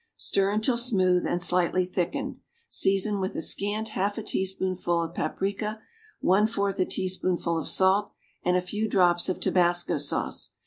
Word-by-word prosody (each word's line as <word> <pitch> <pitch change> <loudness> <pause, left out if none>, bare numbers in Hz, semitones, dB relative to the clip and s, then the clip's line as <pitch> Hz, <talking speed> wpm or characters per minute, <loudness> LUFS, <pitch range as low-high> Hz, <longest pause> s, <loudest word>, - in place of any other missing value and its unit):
Stir 195 0 +1
until 220 +4 +1
smooth 185 -7 +2
and 175 - 0
slightly 180 +1 +2
thickened; 185 +10 -3 0.3
season 195 +1 +2
with 190 0 -3
a - - -2
scant 210 +5 0
half 205 0 -1
a 225 - -4
teaspoonful 185 -3 -1
of 165 0 -3
paprica, 200 +7 -2 0.4
one 200 +4 +4
fourth 200 -3 -2
a 185 - +3
teaspoonful 185 -2 -1
of 160 - -5
salt 195 +2 +2 0.3
and 180 +1 +2
a - - +1
few 210 +4 -2
drops 175 -2 +3
of 185 - -2
tabasco 175 -2 +2
sauce. 140 - -2
190 Hz, 160 wpm, -27 LUFS, 180-205 Hz, 0.4 s, one